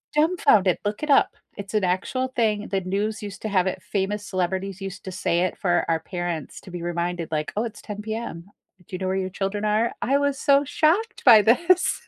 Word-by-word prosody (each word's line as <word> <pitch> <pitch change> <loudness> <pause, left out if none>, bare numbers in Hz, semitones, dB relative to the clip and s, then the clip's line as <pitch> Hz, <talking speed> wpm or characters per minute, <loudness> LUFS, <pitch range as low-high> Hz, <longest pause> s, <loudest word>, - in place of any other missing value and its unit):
dumbfounded. 300 - +4
Look 205 +5 -2
it 300 - -3
up, 280 - +4 0.2
it's 200 +1 -7
an 210 -2 +1
actual 190 +8 0
thing, 215 -3 +1
the 195 -1 0
news 205 +4 -2
used 200 -1 -7
to 215 - -2
have 190 -2 +2
it, - - -3
famous 205 +1 -2
celebrities 190 +1 -2
used 195 -1 -6
to 190 - -5
say 175 -1 0
it 185 - -1
for 175 -2 +1
our 165 -1 +2
parents 175 -4 -4
to 185 - -12
be 175 -1 -6
reminded 175 0 -3
like, 155 -1 -2
"Oh, 215 - 0
it's 225 -3 -6
10 210 0 -7
PM. 220 -6 -5 0.4
Do 185 - -6
you - - -3
know 185 0 -3
where 190 - 0
your 190 -1 -1
children 195 +2 -3
are?" 215 +2 +1
I 275 +2 +2
was 285 -1 0
so 280 -1 +4
shocked 360 - +1
by 225 -5 +9
this. 340 - +3
200 Hz, 220 wpm, -24 LUFS, 185-230 Hz, 0.4 s, by